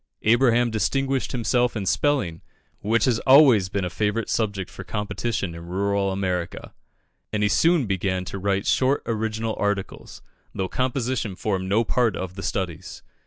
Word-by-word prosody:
Abraham 120 +1 +3
distinguished 135 +4 0
himself 120 0 +1
in 105 -3 -3
spelling, 100 - 0 0.4
which 115 +3 +1
has 120 -4 +2
always 130 -9 +6
been 100 -1 -2
a - - -2
favourite 105 +3 -1
subject 100 -5 -1
for 95 - -9
competition 105 -2 -3
in 85 0 -9
rural 100 +2 0
America, 90 -3 -3 0.6
and 105 -1 0
he 105 - +3
soon 165 +3 +3
began 95 -2 -1
to 100 - -6
write 100 0 0
short 135 +2 +2
original 110 0 -2
articles, 105 -2 -3 0.3
though 95 - -1
composition 125 -3 -2
formed 95 -1 -2
no 110 +4 +3
part 115 -3 +1
of 95 -1 -5
the 95 - -8
studies. 90 -4 -4
105 Hz, 155 wpm, -24 LUFS, 95-120 Hz, 0.6 s, always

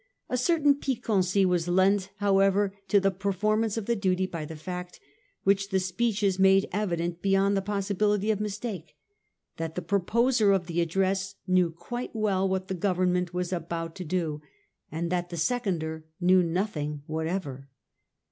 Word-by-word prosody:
A - - 0
certain 290 +2 +3
piquancy 200 -8 +1
was 180 -2 +1
lent, 190 +2 +3
however, 195 -1 +2
to 200 - +4
the 195 0 +2
performance 210 +3 0
of 220 - -3
the 235 - +1
duty 190 -2 +1
by 165 -4 -5
the 160 - -8
fact, 180 +3 -7 0.4
which 195 0 +2
the 190 -1 +2
speeches 195 0 0
made 195 0 +5
evident 175 -4 -2
beyond 195 0 +2
the 195 - +1
possibility 205 +1 0
of 210 - -1
mis 210 -1 -3
take, 195 -9 -6 0.6
that 165 0 -4
the 180 - -2
proposer 210 +4 +2
of 190 -3 0
the 170 0 -1
address 190 +3 0
knew 185 -2 +3
quite 240 +10 -6
well 195 -3 +1
what 190 0 -2
the - - -3
Government 180 -1 0
were 180 0 -1
about 165 -1 -3
to 185 - -6
do, 160 -3 -2 0.5
and 165 +2 -3
that 175 -1 -1
the 170 - -6
seconder 160 -6 -1
knew 185 +1 +5
nothing 165 -5 -2
whatever. 155 -4 -4
190 Hz, 160 wpm, -27 LUFS, 175-205 Hz, 0.6 s, made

